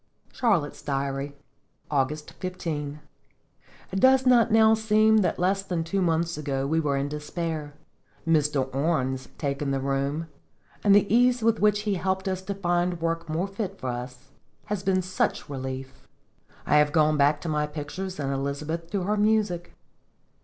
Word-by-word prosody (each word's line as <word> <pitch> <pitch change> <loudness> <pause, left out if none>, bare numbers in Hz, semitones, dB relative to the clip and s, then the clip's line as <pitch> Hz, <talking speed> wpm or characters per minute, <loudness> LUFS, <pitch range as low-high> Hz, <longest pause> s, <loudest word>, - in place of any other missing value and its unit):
CHARLOTTE'S 195 - 0
DIARY. 140 0 -3 0.6
August 150 +2 -1
15. 155 -5 -4 0.9
It 195 - -1
does 260 +3 +5
not 245 -3 +6 0.3
seem 220 0 +4
now - - +4
that 185 - 0
less 190 +2 +1
than 180 -4 -2
two 195 +4 -1
months 165 -2 0
ago 135 -2 -2
we 160 +3 +1
were 145 -3 0
in 140 +1 -1
despair. 150 0 -4 0.5
Mr. 150 -4 +2
Orne's 135 -3 0
taking 140 0 -2
the 135 0 0
room, 140 +4 -1 0.6
and 200 -1 +6
the 205 - +5
ease 245 0 +4
with 225 0 +3
which 210 0 +3
he 210 -1 -1
helped 190 +1 -1
us 185 -1 -1
to 180 -2 0
work 165 0 -2
more 165 +5 -1
fit 195 -1 -5
for 130 - -3
us, 125 +2 -8 0.3
have 210 -2 -3
been 185 -1 +1
such 185 +1 -1
relief. 130 -1 -6 0.6
I 150 - +4
have 150 0 +4
gone 155 -1 +4
back 145 +1 +3
to - - -5
my 150 -1 0
pictures, 155 +5 -6
and 140 -1 -1
Elizabeth 150 +5 -3
to 195 0 -1
her 210 +3 0
music. 210 -5 +1
165 Hz, 160 wpm, -26 LUFS, 145-195 Hz, 0.9 s, not